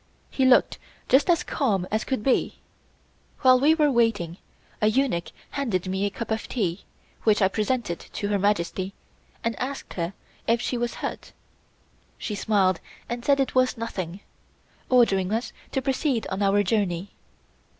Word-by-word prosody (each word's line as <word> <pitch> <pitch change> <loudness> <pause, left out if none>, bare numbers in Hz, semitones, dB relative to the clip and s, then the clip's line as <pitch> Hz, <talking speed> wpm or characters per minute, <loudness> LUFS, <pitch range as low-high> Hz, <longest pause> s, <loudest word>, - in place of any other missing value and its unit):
He 265 - +1
looked 255 -1 +4 0.3
just 275 +6 +4
as 340 -1 +4
calm 200 - 0
as 215 +1 +1
could 260 -6 -2
be. 265 - +1 0.8
While 255 -2 +6
we 300 +4 +5
were 300 -3 +3
waiting 215 -9 +1 0.4
a 215 - +4
eunuch 215 -7 +1 0.2
handed 220 -11 -1
me 190 +2 0
a - - +1
cup 225 +3 -6
of 220 - -2
tea, 195 -6 -2 0.4
which 215 -2 +3
I 190 - +5
presented 210 -2 -1
to 205 - -5
Her 205 -1 +1
Majesty, 190 -1 0 0.5
and 230 -1 0
asked 270 +2 -4
her 170 +2 -3 0.3
if 230 +1 +3
she 245 - -2
was 240 0 -2
hurt. - - -6 0.8
She 215 - -4
smiled 195 -4 +2 0.3
and 240 0 -4
said 280 +1 +3
it 270 - 0
was 255 -1 +2
nothing, 190 -5 -5 0.7
ordering 200 -7 +4
us 225 +3 -2 0.2
to 265 - -1
proceed 265 -3 0
on 190 +2 -2
our 200 +1 +3
journey. 195 -2 0
220 Hz, 160 wpm, -25 LUFS, 195-255 Hz, 0.8 s, While